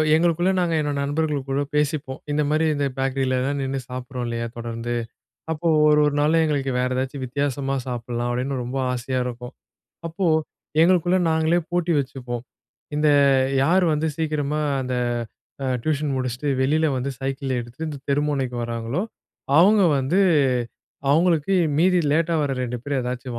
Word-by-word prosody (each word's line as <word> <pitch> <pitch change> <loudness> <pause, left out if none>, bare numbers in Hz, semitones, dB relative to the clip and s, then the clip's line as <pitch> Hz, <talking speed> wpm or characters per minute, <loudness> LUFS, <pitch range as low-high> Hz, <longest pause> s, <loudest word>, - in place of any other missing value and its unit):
எங்களுக்குள்ள 175 +2 +2
நாங்க 170 -2 +1
என்னோட 145 -1 -1
நண்பர்கள் 145 -1 -1
கூட 135 +1 0
பேசிப்போம். 150 -2 -1
இந்த 150 +1 +1
மாரி 155 +1 +2
இந்த 145 0 0
பேக்கரிலலாம் 135 +1 0
நின்னு 135 0 -2
சாப்பிடுறோம் 125 -1 -5
இல்லயா? 115 0 -3
தொடர்ந்து. 115 0 -4 0.6
அப்போ 160 +1 -1 0.2
ஒரு 150 0 +5
1 145 - 0
நாள்ல 160 +2 +3
எங்களுக்கு 140 -3 0
வேற 125 - +1
ஏதாச்சும் 130 +1 -3
வித்தியாசமா 135 +1 -2
சாப்பிடலாம் 120 -1 -3
அப்டின்னு 130 +2 -2
ரொம்ப 130 +2 -3
ஆசையா 125 +1 -2
இருக்கும். 125 +1 -7 0.5
அப்போ 170 +3 -2 0.6
எங்களுக்குள்ள 180 +1 +3
நாங்களே 160 +2 +2
போட்டி 175 -1 +1
வச்சுப்போம். 125 -3 -4 0.5
இந்த 150 0 +3 0.5
யார் 180 +5 +3
வந்து 155 +1 0
சீக்கிரமா 155 -2 -1 0.2
அந்த 125 0 -3 0.7
அ - - -1 0.2
டியூஷன் 150 -2 0
முடிச்சுட்டு, 130 +2 -2
வெளில 155 +4 +2
வந்து 130 +2 -2
சைக்கிள் 135 0 -3
எடுத்துட்டு, 120 +7 -6
இந்த 145 -2 -6
தெரு 140 +1 +2
முனைக்கு 130 -4 -2
வர்றாங்களோ, 115 - -2 0.6
அவங்க 200 +3 +6 0.2
வந்து 140 +9 +1 0.9
அவங்களுக்கு 165 +3 +3 0.2
மீதி 180 +1 +4
லேட்டா 165 +1 +1
வர்ற 135 -2 -1
2 125 0 -4
பேர் 140 -2 -1
ஏதாச்சும் 125 -1 -4
140 Hz, 145 wpm, -23 LUFS, 125-160 Hz, 0.9 s, அவங்க